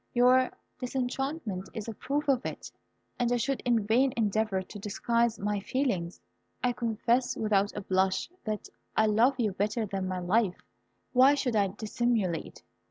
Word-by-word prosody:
Your 255 +1 +5 0.3
disenchantment 250 - -3
is 220 -1 -5
a 225 - -4
proof 290 +7 -2
of 265 -3 +2
it, - - -6 0.5
and 245 -1 +1
I 245 - +3
should 270 +3 -1
in 235 -4 +1
vain 250 +5 +3
endeavour 215 -3 +1
to 205 +3 -10
disguise 230 +3 0
my 205 0 -1
feelings. 195 -7 -1 0.4
I 250 -1 +2
confess 235 +2 0
without 205 -2 +1
a - - -2
blush, 190 0 +1 0.2
that 215 -1 -3 0.3
I 220 - +5
love 225 +6 +4
you 220 -4 +2
better 210 +4 -1
than 195 -2 -3
myself. 185 +2 +1 0.6
Why 265 +3 +6
should 250 -4 -1
I 200 -2 +3
dissimulate? 210 -3 -2
225 Hz, 155 wpm, -29 LUFS, 200-245 Hz, 0.6 s, Why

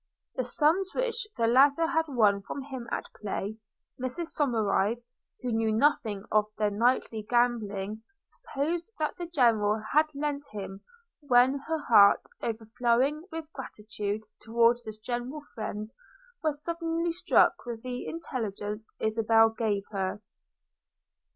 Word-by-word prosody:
The 255 - -1
sums 315 +9 +1
which 480 -3 -1
the 230 - +2
latter 275 +7 +5
had 325 -1 +1
won 215 -7 +3
from 270 +7 -6
him 260 -4 -7
at - - -4
play 210 +1 -3 0.2
– - - -46
Mrs 320 +7 -2
Somerive, 230 -4 +1 0.4
who 250 - -1
knew 225 -1 +1
nothing 220 -4 +2
of 215 -1 +4
their 210 -1 +1
nightly 225 0 +1
gambling, 215 -3 0 0.2
supposed 330 +7 -4
the 320 +3 -2
General 225 -9 +3
had 305 +2 +5
lent 290 0 -2
him; 195 -1 -6 0.4
when 260 -1 +4
her 320 -2 -1
heart, 200 -4 +6 0.2
overflowing 235 - 0
with 320 -1 -7
gratitude 210 -4 -5 0.2
towards 235 +1 +3
this 215 -1 -6
generous 245 +6 -5
friend, 215 0 -5 0.5
was 300 -2 -2
suddenly 335 0 -1
struck 340 +2 +3
with 230 -2 -5
the 250 -1 -5
intelligence 220 -8 -4
Isabella 225 0 +3
gave 210 -4 0
her. 195 -1 -2
240 Hz, 130 wpm, -29 LUFS, 215-295 Hz, 0.5 s, heart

